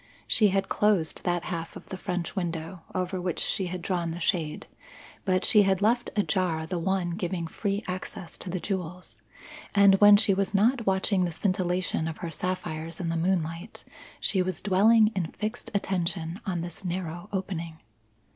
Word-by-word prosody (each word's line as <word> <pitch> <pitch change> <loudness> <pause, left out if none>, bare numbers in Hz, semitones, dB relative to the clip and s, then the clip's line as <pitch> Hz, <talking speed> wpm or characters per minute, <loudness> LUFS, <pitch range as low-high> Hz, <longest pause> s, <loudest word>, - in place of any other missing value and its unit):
She 215 - +5
had 195 0 +1
closed 200 -7 +1
that 175 -1 0
half 165 -2 -5
of - - -11
the - - -4
French 180 -2 -3
window 170 -1 -3
over 185 0 -1
which 180 -2 -2
she 190 -4 0
had 180 0 -5
drawn 175 -2 -1
the 165 +1 -5
shade; 165 -4 -1 0.6
but 185 -2 +2
she 210 - +6
had 190 -2 +2
left 235 +4 +2
ajar 185 -6 0
the 180 +1 -3
one 185 0 0
giving 175 -1 -2
free 200 +5 -2
access 180 -1 -5
to 185 - -3
the 185 +1 -2
jewels; 180 -2 -5 0.5
and 200 -1 +6
when 205 0 +9
she 205 -1 +4
was 195 +1 -1
not 230 +3 +3
watching 190 0 +2
the 175 - -1
scintillation 180 -1 0
of 160 - -5
her 170 -2 -5
sapphires 165 -2 -3
in 175 -3 -2
the 165 - -1
moonlight, 170 +2 -2 0.3
she 190 - +2
was 185 -1 -2
dwelling 215 +3 +5
in 180 -4 0
fixed 215 +3 -4
attention 175 -2 -1
on 175 -3 -1
this 175 +2 -6
narrow 175 +1 -4
opening. 170 -4 -4
185 Hz, 175 wpm, -27 LUFS, 170-195 Hz, 0.6 s, when